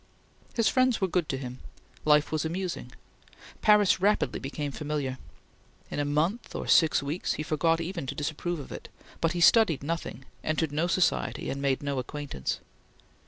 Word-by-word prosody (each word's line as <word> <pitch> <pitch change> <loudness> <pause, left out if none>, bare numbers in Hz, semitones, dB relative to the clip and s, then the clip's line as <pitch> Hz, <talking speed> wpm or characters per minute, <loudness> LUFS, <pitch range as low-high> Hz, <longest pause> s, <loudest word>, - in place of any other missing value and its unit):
His 230 -2 +3
friends 255 -2 +3
were 190 - +1
good 175 -3 0
to 135 - -1
him. 130 -1 -7 0.5
Life 150 -1 +4
was 155 -2 0
amusing. 170 -5 -3 0.7
Paris 210 -3 +5
rapidly 210 +2 +2
became 145 +1 -4
familiar. 145 -3 -3 0.7
In - - -3
a 145 - +1
month 160 +11 -1
or - - -4
six 160 -3 +5
weeks 150 +6 -2
he 155 - -3
forgot 165 +1 +1
even 170 -3 -4
to - - -4
disapprove 160 +4 -2
of 140 - -9
it; - - -8 0.3
but 165 0 +1
he 175 - -2
studied 170 - +5
nothing, 145 -5 -4 0.2
entered 155 -1 0
no 155 +4 0
society, 180 0 +1
and 140 - -4
made 140 0 0
no 140 -2 -1
acquaintance. 130 - -4
155 Hz, 165 wpm, -28 LUFS, 145-175 Hz, 0.7 s, Paris